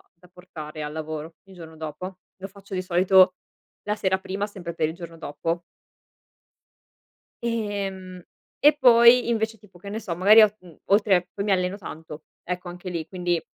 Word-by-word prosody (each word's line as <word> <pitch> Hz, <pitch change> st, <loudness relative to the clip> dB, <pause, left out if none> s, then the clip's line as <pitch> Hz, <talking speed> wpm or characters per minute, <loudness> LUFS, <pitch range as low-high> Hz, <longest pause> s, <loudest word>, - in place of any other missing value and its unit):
da 180 Hz, +1 st, -21 dB
portare 160 Hz, -4 st, -9 dB
al 150 Hz, 0 st, -5 dB
lavoro 155 Hz, +1 st, -6 dB
il 195 Hz, -1 st, -17 dB
giorno 165 Hz, -2 st, -11 dB
dopo, 160 Hz, +4 st, -7 dB, 0.2 s
lo 190 Hz, +1 st, -7 dB
faccio 200 Hz, 0 st, -14 dB
di 185 Hz, -, -1 dB
solito 185 Hz, +1 st, +4 dB, 0.5 s
la 210 Hz, -, 0 dB
sera 190 Hz, -2 st, 0 dB
prima 195 Hz, +2 st, -4 dB
sempre 180 Hz, -5 st, -8 dB
per 155 Hz, -2 st, 0 dB
il 160 Hz, -, -6 dB
giorno 170 Hz, -2 st, -10 dB
dopo. 165 Hz, +2 st, -4 dB, 1.8 s
Ehm, 200 Hz, -5 st, -4 dB, 0.4 s
e 295 Hz, +1 st, +5 dB
poi 235 Hz, -1 st, +6 dB
invece, 225 Hz, -1 st, -1 dB
tipo, 200 Hz, -3 st, -19 dB
che 200 Hz, +3 st, -10 dB
ne 215 Hz, +2 st, -4 dB
so, 185 Hz, -6 st, -5 dB
magari, 205 Hz, +5 st, +7 dB
on 210 Hz, -1 st, +5 dB
mhmm, 175 Hz, -3 st, -16 dB
oltre 195 Hz, -3 st, +3 dB
poi 200 Hz, -, -3 dB
mi 210 Hz, -, 0 dB
alleno 185 Hz, +1 st, 0 dB
tanto, 160 Hz, -5 st, -9 dB, 0.2 s
ecco, 180 Hz, 0 st, -5 dB
anche 180 Hz, +1 st, -8 dB
lì 170 Hz, -3 st, -4 dB
quindi 175 Hz, -2 st, -2 dB
185 Hz, 170 wpm, -24 LUFS, 170-200 Hz, 1.8 s, magari